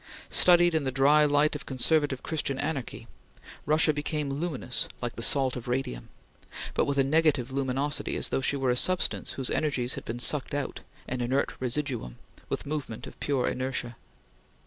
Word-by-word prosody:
Studied 175 Hz, -1 st, +6 dB
in 160 Hz, -2 st, +1 dB
the 135 Hz, -, -1 dB
dry 145 Hz, +3 st, +5 dB
light 145 Hz, +1 st, +2 dB
of 150 Hz, -, -7 dB
conservative 140 Hz, 0 st, +1 dB
Christian 140 Hz, -4 st, -2 dB
anarchy, 135 Hz, -3 st, -4 dB, 0.6 s
Russia 155 Hz, +1 st, +4 dB
became 145 Hz, -1 st, -2 dB
luminous 140 Hz, -4 st, -1 dB
like 120 Hz, -1 st, -4 dB
the -, -, -6 dB
salt 130 Hz, +2 st, +4 dB
of 125 Hz, -2 st, -7 dB
radium; 120 Hz, -, -3 dB, 0.6 s
but -, -, +1 dB
with 140 Hz, 0 st, -2 dB
a 135 Hz, -, +5 dB
negative 140 Hz, -3 st, +2 dB
luminosity 135 Hz, +2 st, -1 dB
as -, -, +2 dB
though -, -, 0 dB
she 135 Hz, -, 0 dB
were 135 Hz, -2 st, +1 dB
a -, -, +1 dB
substance 180 Hz, +6 st, +1 dB
whose 135 Hz, -2 st, 0 dB
energies 130 Hz, -5 st, 0 dB
had -, -, -6 dB
been 115 Hz, -, -4 dB
sucked 140 Hz, +3 st, +1 dB
out 145 Hz, -2 st, -3 dB, 0.3 s
an 125 Hz, 0 st, -3 dB
inert 130 Hz, +3 st, 0 dB
residuum 125 Hz, -, -3 dB, 0.3 s
with -, -, -3 dB
movement 140 Hz, -6 st, -5 dB
of -, -, -12 dB
pure 135 Hz, -3 st, 0 dB
inertia. 130 Hz, -2 st, -3 dB
135 Hz, 170 wpm, -28 LUFS, 125-150 Hz, 0.6 s, Studied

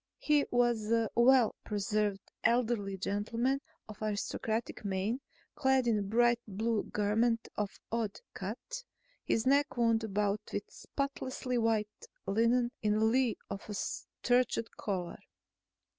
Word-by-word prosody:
He 300 Hz, -1 st, +3 dB
was 240 Hz, -3 st, +2 dB
a 230 Hz, -2 st, +2 dB
well 245 Hz, -1 st, +5 dB
preserved 205 Hz, -1 st, -1 dB
elderly 225 Hz, -4 st, +1 dB
gentleman 230 Hz, +8 st, 0 dB, 0.3 s
of 215 Hz, -1 st, -11 dB
aristocratic 215 Hz, +2 st, -2 dB
mien, 200 Hz, +6 st, -1 dB, 0.3 s
clad 265 Hz, -1 st, +2 dB
in 225 Hz, -3 st, +3 dB
a -, -, -1 dB
bright 235 Hz, +4 st, +3 dB
blue 215 Hz, +2 st, -1 dB
garment 225 Hz, +3 st, +1 dB
of 205 Hz, -2 st, -3 dB
odd 225 Hz, -3 st, -1 dB
cut, 235 Hz, -, -6 dB, 0.4 s
his 225 Hz, -, +1 dB
neck 280 Hz, +1 st, +3 dB
wound 230 Hz, -1 st, +3 dB
about 205 Hz, 0 st, 0 dB
with -, -, -2 dB
spotlessly 260 Hz, -3 st, -3 dB
white 220 Hz, -2 st, 0 dB, 0.2 s
linen 230 Hz, +4 st, +2 dB
in 210 Hz, 0 st, +2 dB
lieu 255 Hz, -2 st, +2 dB
of 200 Hz, +2 st, -7 dB
a 210 Hz, -, -3 dB
starched 245 Hz, +1 st, 0 dB
collar. 185 Hz, -4 st, -3 dB
225 Hz, 125 wpm, -32 LUFS, 210-245 Hz, 0.4 s, well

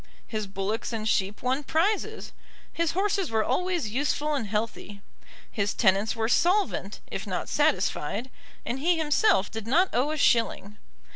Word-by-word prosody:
His 215 Hz, -2 st, -4 dB
bullocks 195 Hz, +4 st, -3 dB
and 220 Hz, -2 st, -3 dB
sheep 200 Hz, 0 st, 0 dB
won 260 Hz, +3 st, 0 dB
prizes. 345 Hz, +9 st, -1 dB, 0.4 s
His 335 Hz, -2 st, 0 dB
horses 390 Hz, -1 st, 0 dB
were 220 Hz, -1 st, +1 dB
always 355 Hz, -7 st, -1 dB
useful 290 Hz, +4 st, 0 dB
and 265 Hz, -7 st, -2 dB
healthy. 210 Hz, -1 st, -3 dB, 0.5 s
His 205 Hz, -1 st, -1 dB
tenants 200 Hz, +1 st, +2 dB
were 220 Hz, -1 st, 0 dB
solvent, 365 Hz, -, +1 dB
if -, -, -5 dB
not -, -, -3 dB
satisfied, 255 Hz, +2 st, 0 dB, 0.3 s
and 255 Hz, -, -3 dB
he 340 Hz, +4 st, +2 dB
himself 310 Hz, -, +2 dB
did 225 Hz, 0 st, -6 dB
not 345 Hz, +10 st, +3 dB
owe 255 Hz, +5 st, +2 dB
a 310 Hz, -, -2 dB
shilling. 225 Hz, -6 st, +1 dB
250 Hz, 150 wpm, -27 LUFS, 215-325 Hz, 0.5 s, not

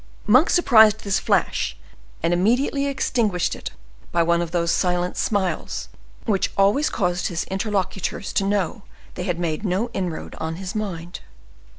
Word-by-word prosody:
Monk 255 Hz, +10 st, +5 dB
surprised 220 Hz, -, +5 dB
this 200 Hz, -2 st, +1 dB
flash, -, -, 0 dB, 0.5 s
and 170 Hz, +1 st, +2 dB
immediately 250 Hz, +9 st, +2 dB
extinguished 220 Hz, -9 st, 0 dB
it -, -, -6 dB, 0.4 s
by 170 Hz, -1 st, +3 dB
one 170 Hz, +1 st, +2 dB
of 170 Hz, -, -3 dB
those 170 Hz, 0 st, 0 dB
silent 180 Hz, -1 st, 0 dB
smiles 200 Hz, -4 st, -1 dB, 0.4 s
which 200 Hz, -4 st, +1 dB
always 200 Hz, +10 st, +3 dB
caused 180 Hz, -3 st, 0 dB
his 170 Hz, -1 st, -2 dB
interlocutors 195 Hz, -1 st, -2 dB
to 200 Hz, -, +2 dB
know 200 Hz, +2 st, -1 dB, 0.3 s
they 180 Hz, -, -5 dB
had 180 Hz, -3 st, -1 dB
made 170 Hz, 0 st, -2 dB
no 205 Hz, +4 st, -1 dB
inroad 180 Hz, -4 st, -4 dB
on 160 Hz, 0 st, -3 dB
his 185 Hz, +2 st, -6 dB
mind. 180 Hz, -6 st, -4 dB
190 Hz, 150 wpm, -23 LUFS, 175-215 Hz, 0.5 s, Monk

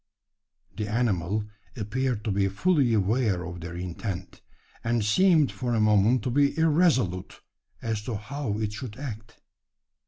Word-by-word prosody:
The 105 Hz, -2 st, -2 dB
animal 105 Hz, -3 st, 0 dB, 0.3 s
appeared 115 Hz, +1 st, -1 dB
to 110 Hz, -, 0 dB
be 100 Hz, 0 st, +2 dB
fully 135 Hz, -, +2 dB
aware 105 Hz, -2 st, +1 dB
of 85 Hz, 0 st, -7 dB
their 85 Hz, +1 st, -6 dB
intent; 90 Hz, +1 st, -5 dB, 0.4 s
and 115 Hz, -2 st, +1 dB
seemed 160 Hz, -, +4 dB
for 120 Hz, -2 st, -2 dB
a -, -, +2 dB
moment 105 Hz, +2 st, +4 dB
to 125 Hz, -, -1 dB
be 140 Hz, +3 st, +2 dB
irresolute 150 Hz, -, +2 dB, 0.4 s
as 110 Hz, -2 st, -1 dB
to 120 Hz, -, -3 dB
how 110 Hz, 0 st, -4 dB
it 105 Hz, -1 st, -2 dB
should 105 Hz, +1 st, -7 dB
act. 115 Hz, -5 st, -8 dB
110 Hz, 145 wpm, -27 LUFS, 100-130 Hz, 0.4 s, seemed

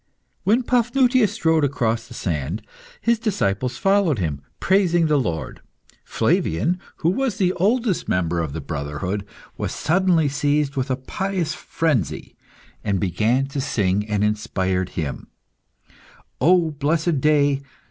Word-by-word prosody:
When 225 Hz, +6 st, +3 dB
Paphnutius 245 Hz, -2 st, +3 dB
strode 160 Hz, -1 st, +2 dB
across 115 Hz, -4 st, 0 dB
the 120 Hz, -, -11 dB
sand, 85 Hz, -, -3 dB, 0.4 s
his 235 Hz, -1 st, +2 dB
disciples 125 Hz, -, -1 dB
followed 195 Hz, -7 st, +2 dB
him, 75 Hz, -7 st, -2 dB, 0.2 s
praising 175 Hz, -3 st, +3 dB
the 150 Hz, -2 st, +3 dB
Lord. 85 Hz, -, -3 dB, 0.4 s
Flavian, 165 Hz, -, 0 dB, 0.2 s
who 165 Hz, -, 0 dB
was 255 Hz, 0 st, -1 dB
the 185 Hz, -2 st, +2 dB
oldest 210 Hz, +2 st, +1 dB
member 85 Hz, -1 st, 0 dB
of 80 Hz, -4 st, -2 dB
the 80 Hz, -, -4 dB
brotherhood, 75 Hz, +7 st, -3 dB, 0.3 s
was -, -, -3 dB
suddenly 175 Hz, -2 st, +2 dB
seized 145 Hz, 0 st, 0 dB
with 135 Hz, 0 st, -1 dB
a 130 Hz, -, +1 dB
pious 175 Hz, +4 st, -2 dB
frenzy 155 Hz, -, -2 dB, 0.5 s
and 100 Hz, -3 st, 0 dB
began 110 Hz, +9 st, +1 dB
to 140 Hz, 0 st, -3 dB
sing 100 Hz, -3 st, 0 dB
an 105 Hz, -1 st, +1 dB
inspired 95 Hz, -4 st, 0 dB
hymn 75 Hz, -5 st, -3 dB, 1.1 s
"O 170 Hz, +2 st, +4 dB
blessed 150 Hz, +1 st, 0 dB
day! 145 Hz, -2 st, +3 dB
140 Hz, 130 wpm, -22 LUFS, -, 1.1 s, O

